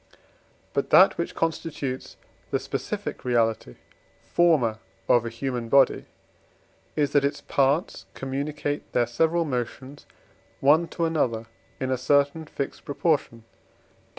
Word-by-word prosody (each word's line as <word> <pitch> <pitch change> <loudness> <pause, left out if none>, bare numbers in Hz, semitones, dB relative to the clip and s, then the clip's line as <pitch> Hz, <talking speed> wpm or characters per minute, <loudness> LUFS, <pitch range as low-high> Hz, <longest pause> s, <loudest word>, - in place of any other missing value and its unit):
But - - -1
that - - +6
which - - -3
constitutes 155 -5 -3 0.3
the - - +1
specific - - -5
reality 115 - 0 0.6
(forma) 145 -11 +3 0.3
of 120 -1 +4
a - - -2
human 120 0 -4
body 135 0 +4 0.9
is, 145 -2 +1
that 145 - +3
its 140 +1 -1
parts 140 - 0
communicate 145 +2 -4
their 120 - +3
several 165 +8 +1
motions 130 +1 -5 0.5
one 155 +5 +4
to 170 - -2
another 125 -9 0 0.3
in 130 0 -2
a 130 - 0
certain 145 +4 +2
fixed 140 -2 -5
proportion 145 -5 -1
(Def. - - -28
140 Hz, 125 wpm, -25 LUFS, 120-150 Hz, 0.9 s, that